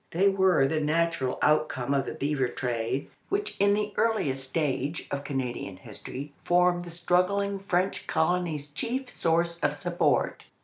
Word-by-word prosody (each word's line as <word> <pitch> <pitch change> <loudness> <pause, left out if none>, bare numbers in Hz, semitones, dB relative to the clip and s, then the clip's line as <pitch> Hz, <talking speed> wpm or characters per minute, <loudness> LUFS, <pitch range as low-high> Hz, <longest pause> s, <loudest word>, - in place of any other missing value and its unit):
They 190 +4 +3
were 190 -7 +4
the 155 +3 0
natural 155 -3 +1
outcome 145 -3 +2
of 135 -1 +1
the - - -4
beaver 140 -2 0
trade, 120 +2 -2 0.2
which 405 +1 -1
in 200 +1 +4
the 210 0 -2
earliest 140 -13 0
stage 150 0 -1
of 140 0 -2
Canadian 125 -8 -3
history 130 +7 -8
formed 175 0 +3
the - - -8
struggling 185 +4 +1
French 190 0 -1
colony's 160 -4 0
chief 245 - -3
source 170 +1 +1
of 145 - +1
support. 175 +3 0
165 Hz, 145 wpm, -28 LUFS, 140-180 Hz, 0.2 s, were